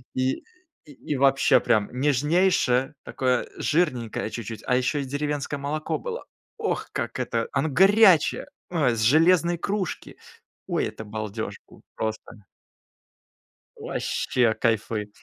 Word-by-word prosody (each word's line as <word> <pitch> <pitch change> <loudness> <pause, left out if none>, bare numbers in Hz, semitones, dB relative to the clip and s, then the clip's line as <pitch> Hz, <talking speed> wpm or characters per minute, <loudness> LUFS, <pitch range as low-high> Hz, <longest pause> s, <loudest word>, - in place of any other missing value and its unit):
И, 130 0 -1 0.4
и 145 0 -6
вообще 135 0 +4
прям 110 -4 +1
нежнейшее, 145 0 +2
такое 125 -1 -1
жирненькое 125 -10 -1
чуть-чуть, 115 -1 -6
а 125 - +2
еще 130 +3 0
и - - -3
деревенское 145 +1 -3
молоко 150 +2 -3
было. 485 0 -6 0.3
Ох, 440 -1 -2
как - - -4
это! - - -1
Оно 160 - 0
горячее, 190 +1 +5 0.2
ой, 145 -9 +2
с 110 - -2
железной 170 +7 +4
кружки, 195 -2 -3 0.5
ой, - - 0
это 110 - -7
балдеж 110 +1 -5
был, - - -18
просто! 110 -2 -5 1.3
Ваще 120 -3 0
кайфует. 110 -2 0
135 Hz, 120 wpm, -25 LUFS, 115-160 Hz, 1.3 s, горячее